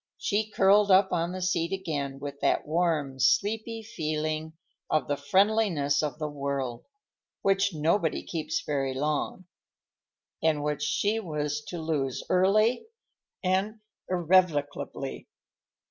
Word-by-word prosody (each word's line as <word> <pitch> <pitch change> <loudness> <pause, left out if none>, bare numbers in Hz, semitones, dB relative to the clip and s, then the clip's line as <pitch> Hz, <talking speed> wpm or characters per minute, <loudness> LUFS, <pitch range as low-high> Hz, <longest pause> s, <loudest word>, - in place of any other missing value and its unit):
She 215 +1 -1
curled 200 0 +4
up 190 0 +5
on 170 0 0
the 185 0 -4
seat 170 -2 0
again 150 -8 -3
with 140 0 -7
that - - +1
warm, 155 -4 0
sleepy 220 - +1
feeling 155 -6 -3 0.4
of 155 -5 +1
the 145 - 0
friendliness 185 -1 +2
of 150 -1 -3
the 155 -1 -3
world—which 145 - -3
nobody 160 +3 +1
keeps 165 -1 -3
very 135 -3 -1
long, 150 +6 -2 1.0
and 155 -2 +1
which 150 0 -2
she 205 +9 +1
was 150 -6 -3
to 175 - -6
lose 150 -5 -2
early 215 - +3 0.6
and 195 +4 0 0.3
irrevocably. 165 -6 0
160 Hz, 115 wpm, -28 LUFS, 145-195 Hz, 1.0 s, up